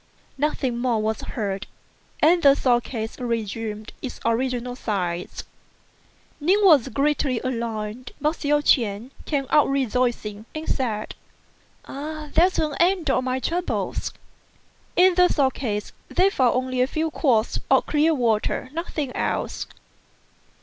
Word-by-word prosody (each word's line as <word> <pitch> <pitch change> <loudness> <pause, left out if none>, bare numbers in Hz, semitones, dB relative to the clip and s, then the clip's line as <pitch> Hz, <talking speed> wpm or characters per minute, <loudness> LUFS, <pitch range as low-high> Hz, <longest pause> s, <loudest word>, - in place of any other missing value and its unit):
Nothing 265 -4 -1
more 240 -3 +1
was 215 0 -1
heard, 200 -3 -4 0.5
and 340 +3 +5
the 280 -2 +7
sword 245 -3 +2
case 225 -1 -5
resumed 225 -2 -3
its 260 - -6
original 245 +1 0
size. 180 -7 -3 1.0
Ning 350 +7 +3
was 305 - +6
greatly 275 0 0
alarmed, 230 -1 -4
but 305 +2 0
Hsiao 295 0 +1
ch'ien 230 -3 +1
came 280 -3 -1
out 300 - +5
rejoicing, 240 -5 -1
and 310 +1 -5
said, 220 -5 -2 0.7
"There's 310 +5 0
an 305 -2 0
end 345 -4 +3
of 255 - +1
my 255 0 -1
troubles." 345 +6 -2 0.8
In 365 +1 +6
the 360 0 +5
sword 270 -6 +2
case 210 -5 -3 0.2
they 385 +2 +3
found 255 - +2
only 255 0 0
a 255 - +3
few 315 +3 -2
quarts 240 -8 +1
of - - +4
clear 310 +2 +2
water; 235 +1 0
nothing 305 -5 -4
else. - - -2
255 Hz, 130 wpm, -24 LUFS, 225-300 Hz, 1.0 s, the